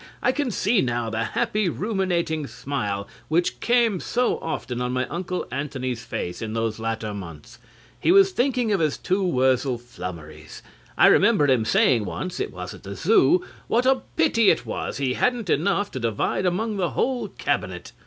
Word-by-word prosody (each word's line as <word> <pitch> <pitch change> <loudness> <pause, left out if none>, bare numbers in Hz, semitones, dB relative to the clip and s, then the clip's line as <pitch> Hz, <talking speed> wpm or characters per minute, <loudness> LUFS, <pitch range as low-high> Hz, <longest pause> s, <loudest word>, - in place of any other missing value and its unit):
I 250 - +4
can 285 -1 -1
see 215 0 +2
now 120 -2 -1
the 110 +1 -1
happy 210 - 0
ruminating 175 -6 -1
smile 105 -10 -3 0.2
which 170 +3 0
came 235 -5 +2
so 245 +6 0
often 125 -6 -4
on 125 0 -1
my 130 0 0
Uncle 180 +1 -3
Antony's 130 -3 -3
face 90 -6 -5
in 110 -1 -4
those 115 -1 -2
latter 110 -1 -3
months. 85 -7 -9 0.4
He - - +3
was 390 +1 +6
thinking 250 - +1
of 200 - +2
his 155 -3 +1
two 190 +2 0
Wurzel 130 -5 +2
Flummerys. 85 -9 -9 0.3
I - - +6
remember 205 -6 +5
him 125 -5 +3
saying 115 0 +3
once 185 - -5
it - - -2
was 90 0 -7
at - - -12
the 100 0 -7
Zoo 180 - +3 0.2
what 240 +2 +2
a 265 0 +3
pity 260 -10 +4
it - - +2
was - - -4
he 135 -2 0
hadn't 240 - 0
enough 200 +5 +1
to 130 - -4
divide 115 - 0
among 210 +4 -1
the 180 -3 0
whole 255 -1 -1
Cabinet. - - -3
150 Hz, 175 wpm, -24 LUFS, -, 0.4 s, was